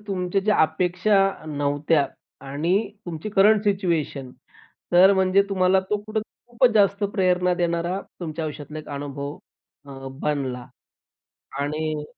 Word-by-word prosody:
तुमच्या 190 -1 -1
ज्या 210 +2 +2
अपेक्षा 180 +6 +1 0.3
नव्हत्या 145 0 +1 0.4
आणि 145 +6 -1 0.3
तुमची 165 +3 -5
करंट 210 +1 +4
सिच्युएशन 170 -9 -1 0.6
तर 185 +3 +7
म्हणजे 190 0 +3
तुम्हाला 190 -1 +3
तो 210 - +2
कुठे 215 +1 -2 0.3
खूपच 240 +1 +3
जास्त 200 -1 +3
प्रेरणा 180 -2 +2
देणारा 175 +1 -1 0.2
तुमच्या 160 -1 -4
आयुष्यातला 150 0 -6
एक 155 - -10
हा 145 - -5
अनुभव 140 +1 -5 0.5
अ, 135 -1 -8
बनला 130 -4 -2 0.9
आणि 155 +1 -2
175 Hz, 125 wpm, -23 LUFS, 150-195 Hz, 0.9 s, तर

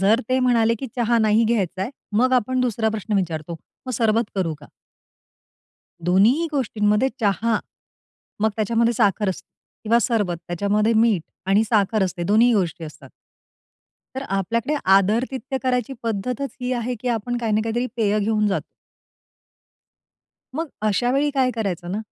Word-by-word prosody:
जर 210 +5 +4
ते 255 0 +2
म्हणाले 230 -2 +3
की 265 - -5
चहा 235 -1 +2
नाही 220 +1 +3
घ्यायचाय, 200 -2 -1 0.3
मग 255 +1 +3
आपण 255 +1 +2
दुसरा 230 -3 0
प्रश्न 220 0 -3
विचारतो, 165 -3 -3 0.3
"मग 255 - -3
सरबत 225 0 +2
करू 165 -4 0
का?" 145 - -13 1.4
दोन्हीही 205 - +3
गोष्टींमध्ये 215 -3 +1
चहा. 215 +2 +1 0.8
मग 220 +1 +3
त्याच्यामध्ये 230 +2 +2
साखर 210 -2 +2
असते 190 - -5 0.4
किंवा 230 +2 +4
सरबत, 205 -7 0
त्याच्यामध्ये 205 +5 +1
मीठ 220 -5 +3 0.2
आणि 200 +3 +3
साखर 215 -1 +1
असते, 180 -1 -4
दोन्हीही 220 +6 +4
गोष्टी 175 -3 -1
असतात. 155 0 -11 1.1
तर 265 - -3
आपल्याकडे 230 +9 -1 0.2
आदरातिथ्य 250 +7 0
करायची 250 0 0
पद्धतच 230 +4 -3
ही 250 +1 -2
आहे 245 0 -2
की 250 - -3
आपण 240 +1 -1
काही 230 -2 -1
ना 215 - +3
काहीतरी 240 +2 -1
पेय 215 -2 +1
घेऊन 215 0 +1
जातो. 195 - -1 1.9
मग 325 -1 -2
अशावेळी 245 +7 +1
काय 260 -2 +2
करायचं 185 -6 -3
ना, 210 - -2
220 Hz, 145 wpm, -22 LUFS, 200-245 Hz, 1.9 s, जर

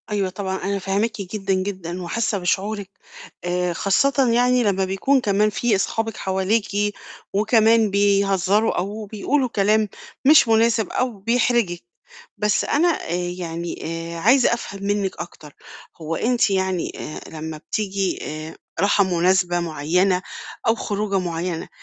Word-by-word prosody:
أيوه، 200 -3 0
طبعًا 190 0 -4
أنا 200 +1 -1
فاهماكِ 200 +3 -1
جدًا، 195 0 -2
جدًا، 185 -2 -3
وحاسّة 210 +4 -1
بشعورِك 200 +2 -1 0.5
آآ، 180 0 -1
خاصّةً 255 +9 +2
يعني 245 +1 +3
لمّا 195 -3 +1
بيكون 195 +9 +2
كمان 210 -1 +2
في 220 +1 +1
أصحابك 225 +3 -2
حواليكِ 205 +2 0 0.4
وكمان 220 +1 +4
بيهزروا 200 +1 +2
أو 210 +4 -3
بيقولوا 250 +6 0
كلام 210 0 +2 0.4
مش 300 -2 +7
مُناسب 225 -1 +3
أو 250 -4 -1
بيحرجِك. 230 - +1 0.5
بس 210 0 +1
أنا 315 +5 +2
آآ، 330 - -1 0.3
يعني 170 -1 -5 0.4
آآ، - - -5
عايزة 240 +7 +4
أفهم 200 -4 -6
منِّك 200 -1 -1
أكتر 150 -4 -9 0.5
هو 160 +1 -3
أنتِ 240 +4 +2
يعني 190 -2 0
آآ، 155 - -6
لمّا 160 0 -6
بتيجي 195 +3 -2
آآ، 155 +1 -6 0.2
راحة 200 +2 +4
مُناسبة 180 0 +2
معيّنة 175 +3 +1 0.5
أو 225 - +4
خروجة 205 -3 -1
معيّنة 170 -1 -3
200 Hz, 130 wpm, -22 LUFS, 185-220 Hz, 0.5 s, مش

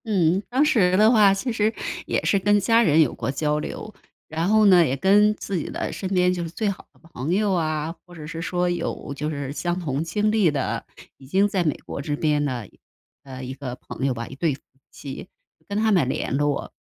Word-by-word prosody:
嗯， 185 -4 +2
当 265 +5 +3
时 185 -10 +3
的 215 +2 +6
话 210 -4 +6
其 195 +6 -2
实 220 0 +1 0.3
也 - - 0
是 200 - +3
跟 205 +2 +3
家 225 +4 +3
人 160 -7 +4
有 145 - +2
过 - - -4
交 150 +2 0
流， 215 +7 -6 0.3
然 160 +2 -2
后 215 0 +5
呢， 180 -3 +7
也 135 -1 -1
跟 210 +6 +4
自 200 -2 -4
己 160 - -3
的 - - -4
身 190 - -4
边 180 -1 +2
就 175 - -3
是 165 - -5
最 210 +5 -2
好 200 - -7
的 - - -27
朋 150 +8 -1
友 205 0 +1
啊， 155 -1 -1
或 175 - -14
者 155 -2 -9
是 165 +1 -6
说 180 0 -1
有 175 -4 -3
就 150 +2 -3
是 140 -3 -4
相 175 +3 -2
同 145 -3 -2
经 210 +6 0
历 215 -6 +3
的， 140 -3 -2 0.3
已 135 - -15
经 195 +8 +3
在 195 -3 0
美 155 -4 0
国 - - -5
这 145 +1 -2
边 150 -1 +1
的， 125 -7 -3 0.6
呃， 130 -1 -9
一 130 +1 -5
个 130 -2 -6
朋 135 +1 -4
友 135 - +1
吧， 115 0 -5
一 - - -11
对 150 -1 0
夫 - - -20 0.3
妻， 140 +5 -8 0.4
跟 200 - -3
他 220 0 +2
们 165 -10 +3
联 130 - -2
络。 145 0 -1
175 Hz, 245 characters per minute, -23 LUFS, 145-200 Hz, 0.6 s, 呢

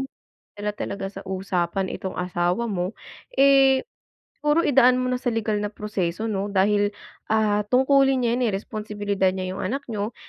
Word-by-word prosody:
mo 270 - -4 0.4
madala 205 0 -4
talaga 200 -1 -4
sa 195 - -9
usapan 190 -1 -2
itong 190 - -5
asawa 180 +5 0
mo, 185 -2 -2 0.4
eh, 270 - +5 0.5
siguro 300 +3 +3
idaan 255 -4 +5
mo 255 - -1
na 250 - 0
sa 250 - -2
legal 215 -2 0
na 210 - -1
proseso, 205 -2 -3
'no? 200 0 -2
Dahil, 205 +1 +2 0.3
ah, 215 -1 +2
tungkulin 265 +1 +3
niya 230 - +2
yan, 250 - +1
eh, - - -1
responsibilidad 205 -2 -1
niya 185 -1 -3
yung - - -6
anak 275 +8 -2
niyo, 210 +1 -3
210 Hz, 170 wpm, -24 LUFS, 195-250 Hz, 0.5 s, eh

